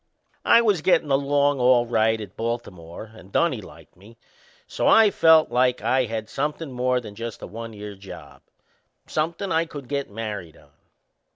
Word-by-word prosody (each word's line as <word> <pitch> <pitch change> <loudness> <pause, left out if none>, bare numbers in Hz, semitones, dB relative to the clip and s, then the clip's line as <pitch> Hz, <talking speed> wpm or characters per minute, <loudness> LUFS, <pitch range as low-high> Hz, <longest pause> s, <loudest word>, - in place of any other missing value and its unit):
I 235 0 +6
was 205 -7 +2
gettin' 165 -4 +2
along 140 0 +2
all 125 -1 +4
right 110 -1 +1
at 105 -4 -9
Baltimore 110 -4 -6
and 100 -3 -15
Dunnie - - +1
liked - - -15
me; 105 +6 -17 0.5
so - - -2
I 220 -2 +6
felt 160 -6 +5
like 125 +1 +1
I 130 0 +2
had 110 -1 -5
somethin' 150 +4 -3
more 125 0 0
than 110 -4 -10
just 115 +1 -7
a - - -4
one 115 +1 -8
year 105 -1 -8
job 95 0 -12 0.6
somethin' 170 +5 -2
I 165 +1 +2
could 145 -5 -9
get 140 0 -3
married 105 -6 -6
on. 70 -1 -22
120 Hz, 170 wpm, -23 LUFS, 110-145 Hz, 0.6 s, I